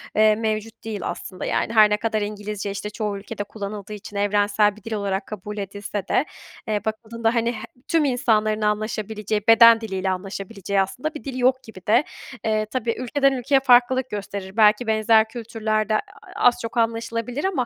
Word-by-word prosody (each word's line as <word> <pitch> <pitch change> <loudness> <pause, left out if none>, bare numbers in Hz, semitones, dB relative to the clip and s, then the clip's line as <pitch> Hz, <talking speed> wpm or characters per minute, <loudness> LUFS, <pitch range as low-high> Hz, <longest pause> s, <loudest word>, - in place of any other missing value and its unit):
eee, 215 0 +5
mevcut 220 0 -3
değil 215 -3 -4
aslında, 185 - -5
yani. 225 - -1
Her 215 -1 +7
ne 210 - +2
kadar 220 -1 -1
İngilizce, 205 -1 -4
işte, 200 +1 -5
çoğu 210 -1 -3
ülkede 205 +1 -6
kullanıldığı 205 0 -7
için 205 0 -10
evrensel 205 0 +2
bir 215 - -17
dil 225 - -5
olarak 200 -1 -2
kabul 210 0 -7
edilse 200 0 -5
de, 290 - +2 0.4
eee, 210 -1 -1
bakıldığında, 225 +2 -2
hani, 235 +1 +1
he 220 0 -7 0.2
tüm 325 -3 +2
insanların 215 -4 +1
anlaşabileceği, 215 0 -1
beden 230 0 +8
diliyle 190 -3 -2
anlaşabileceği 195 +1 -2
aslında 255 - -3
bir - - -7
dil 265 -2 -5
yok 255 +1 +2
gibi 205 -5 -12
de. 235 +7 +5 0.4
Eee, 215 -1 +1
tabii 230 0 -2
ülkeden 275 +2 +2
ülkeye 270 +2 +2
farklılık 255 0 +4
gösterir 200 -1 -6
belki 215 +2 +5
benzer 220 0 +4
kültürlerde 220 -2 -1
a - - +3 0.4
az 245 - +4
çok 230 +1 -6
anlaşılabilir 230 +3 -1
ama 335 -11 0
215 Hz, 175 wpm, -23 LUFS, 205-230 Hz, 0.4 s, beden